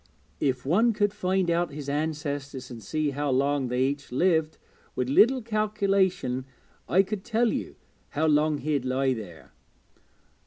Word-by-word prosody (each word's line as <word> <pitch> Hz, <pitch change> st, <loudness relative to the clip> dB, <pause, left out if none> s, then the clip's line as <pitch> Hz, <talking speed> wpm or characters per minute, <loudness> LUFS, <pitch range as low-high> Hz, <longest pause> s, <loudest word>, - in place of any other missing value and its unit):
If 130 Hz, -2 st, -1 dB
one 220 Hz, -, +3 dB
could 205 Hz, -1 st, +1 dB
find 190 Hz, -2 st, 0 dB
out 170 Hz, +1 st, +1 dB
his 145 Hz, -1 st, -7 dB
ancestors 145 Hz, -3 st, -3 dB
and 115 Hz, -2 st, -8 dB
see 150 Hz, +8 st, -1 dB
how 145 Hz, +1 st, -2 dB
long 135 Hz, +1 st, +1 dB
they 125 Hz, +1 st, 0 dB
each 140 Hz, 0 st, -2 dB
lived, 160 Hz, +2 st, +1 dB, 0.4 s
with 125 Hz, 0 st, -1 dB
a -, -, -1 dB
little 245 Hz, -, +5 dB
calculation 200 Hz, -, 0 dB, 0.4 s
I 190 Hz, +2 st, +5 dB
could 200 Hz, 0 st, -5 dB
tell 235 Hz, 0 st, +1 dB
you -, -, -4 dB, 0.3 s
how 155 Hz, +2 st, -1 dB
long 150 Hz, 0 st, +3 dB
he'd 145 Hz, -3 st, -1 dB
lie 130 Hz, +1 st, +1 dB
there.' 100 Hz, -9 st, -9 dB
150 Hz, 155 wpm, -27 LUFS, 135-190 Hz, 0.4 s, little